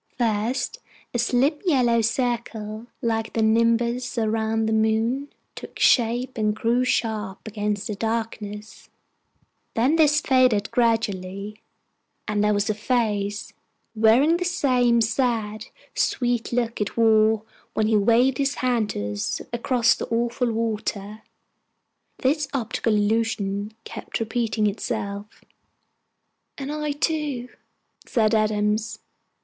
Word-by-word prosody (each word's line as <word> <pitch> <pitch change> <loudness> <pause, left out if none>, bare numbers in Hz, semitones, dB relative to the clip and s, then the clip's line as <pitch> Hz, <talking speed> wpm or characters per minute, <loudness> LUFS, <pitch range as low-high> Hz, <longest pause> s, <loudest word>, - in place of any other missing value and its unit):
First 230 +1 -1 0.3
a 240 - 0
slim 260 +6 +2
yellow 250 -9 +3
circle, 225 -2 -2 0.2
like 225 -1 -1
the 225 - +1
nimbus 230 +3 +1
round 220 0 0
the 220 - +1
moon, 220 +6 +1 0.2
took - - -10
shape 240 +1 +2
and 210 -1 +1
grew 235 +3 +1
sharp 215 -5 -2
against 210 -1 -2
the 215 - -3
darkness; 215 -1 -4 0.9
then 260 +8 +3
this 300 -1 +5
faded 255 -7 +2
gradually, 210 -3 -1 0.7
and 210 -1 0
there 210 - +3
was 205 0 +1
the 215 - 0
Face, 210 -3 -1 0.4
wearing 235 +9 +4
the 360 - -2
same 250 -9 +2
sad, 225 -2 -1 0.3
sweet 245 -2 0
look 235 -2 -1
it 205 - -3
wore 220 -1 +4 0.3
when 220 - +2
he 220 0 +2
waved 235 +5 +3
his 280 0 +1
hand 240 -4 0
to 105 - -3
us 105 0 -2
across 235 0 +3
the - - -5
awful 235 +1 0
water. 215 -2 -3 1.0
This 290 +2 +1
optical 230 -3 0
illusion 210 -1 0
kept - - -6
repeating 225 -1 -1
itself. 205 -1 -4 1.1
"And 275 0 -5
I 300 -1 -2
too," 290 -5 -2 0.6
said 220 -3 +2
Adams. 215 0 +1
225 Hz, 120 wpm, -24 LUFS, 215-245 Hz, 1.1 s, this